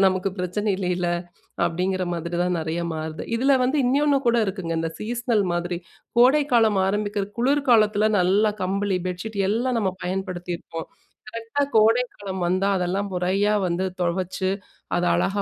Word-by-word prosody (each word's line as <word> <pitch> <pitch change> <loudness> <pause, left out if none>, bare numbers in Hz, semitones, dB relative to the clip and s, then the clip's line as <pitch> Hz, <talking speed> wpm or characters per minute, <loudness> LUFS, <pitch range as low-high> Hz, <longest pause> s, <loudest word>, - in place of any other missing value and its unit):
நமக்கு 185 0 +1
பிரச்சனை 195 +4 -1
இல்லைல, 180 -2 -1 0.6
அப்டிங்கிற 185 +2 -1
மாதிரி 170 +1 -4
தான் 180 -1 0
நிறையா 160 +2 -2
மாறுது. 155 0 -5
இதில 270 +2 +4
வந்து 265 +4 +1
இன்னொன்னு 285 +2 +3
கூட 235 0 +4
இருக்குங்க, 190 -4 -4
இந்த 165 - -2
சீஸ்னல் 235 -1 0
மாதிரி 175 0 -2 0.4
கோடைக்காலம் 245 -6 +4
ஆரம்பிக்கிற 205 0 -1
குளிர் 280 +3 +1
காலத்தில 215 -2 +4
நல்லா 200 +4 +3
கம்பளி, 195 0 0
பெட்ஷீட் 200 +4 -5
எல்லாம் 240 +3 0
நம்ம 195 -4 0
பயன்படுத்தியிருப்போம் 180 -3 -4 0.4
கரெக்டா 230 +5 -3
கோடைக்காலம் 220 -4 +2
வந்தா. 185 +3 +1
அதெல்லாம் 185 +3 -1
முறையா 190 +4 +1
வந்து 175 +2 -1 0.2
துவச்சு 185 +2 -1 0.5
அத 175 - +1
அழகா 200 +1 0
195 Hz, 135 wpm, -24 LUFS, 180-225 Hz, 0.6 s, இதில